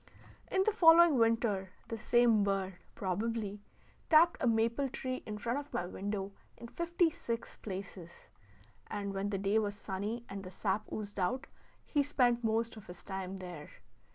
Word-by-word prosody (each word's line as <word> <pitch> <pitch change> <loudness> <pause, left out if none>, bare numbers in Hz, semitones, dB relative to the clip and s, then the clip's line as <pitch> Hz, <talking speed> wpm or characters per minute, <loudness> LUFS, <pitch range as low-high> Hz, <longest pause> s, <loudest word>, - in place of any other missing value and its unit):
In 380 0 +3
the 435 - +3
following 335 - +7
winter 225 -5 +1
the 225 - -4
same 235 -2 +4
bird 195 -1 0 0.2
(probably) 205 +2 -2 0.5
tapped 330 +1 +6
a 250 - +2
maple 235 +4 +2
tree 255 0 -4
in 210 -1 -4
front 235 +6 -1
of 290 0 -10
my 175 - 0
window 195 +2 -4 0.3
in 235 0 -9
fifty 340 +1 +1
six 235 -5 -5
places; 185 -3 -8 0.6
and 200 -1 -4
when 195 +1 -2
the 200 - -1
day 200 +3 +2
was 205 -2 -2
sunny, 205 +4 -4
and 195 0 -6
the 185 - -7
sap 200 +2 -2
oozed 205 -1 -5
out, 245 +9 0 0.4
he 290 - +2
spent 250 -4 +2
most 225 +1 0
of 215 - -12
his 180 0 -11
time 190 -1 -5
there. 175 -5 -8
215 Hz, 165 wpm, -33 LUFS, 195-245 Hz, 0.6 s, following